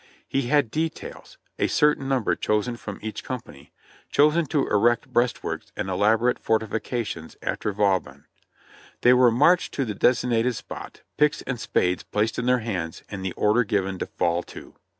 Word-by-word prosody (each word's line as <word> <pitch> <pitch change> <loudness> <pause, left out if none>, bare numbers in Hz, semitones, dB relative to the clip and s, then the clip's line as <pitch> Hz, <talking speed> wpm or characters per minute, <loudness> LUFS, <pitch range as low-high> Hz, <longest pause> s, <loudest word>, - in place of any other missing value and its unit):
He 135 -2 -1
had 140 -4 +2
details 160 +1 -5
— - - -39
a - - +2
certain 150 -2 +2
number 130 -5 +1
chosen 105 +3 0
from 100 -3 -7
each 110 -1 -5
company 125 - -8 0.2
— - - -28
chosen 150 +2 +3
to 145 -1 +1
erect 115 +3 +2
breastworks 120 0 -1
and 95 - -3
elaborate 110 +6 +2
forti 110 0 +1
fications 105 -6 -4
after 105 - -2
Vauban. 95 -9 0 0.8
They 125 - +6
were 125 -1 +6
marched 150 +10 +3
to 135 - 0
the 110 - -3
designated 120 +1 +2
spot, 95 - -9
picks 150 0 +2
and 130 -3 -4
spades 90 -4 0
placed 110 +2 -1
in 125 - -2
their 125 -1 +3
hands, 90 -7 -4
and 100 -2 -5
the 95 -2 -3
order 110 +4 +2
given 95 -3 -1
to - - -3
fall 85 -1 0
to. - - -12
115 Hz, 170 wpm, -24 LUFS, 100-125 Hz, 0.8 s, They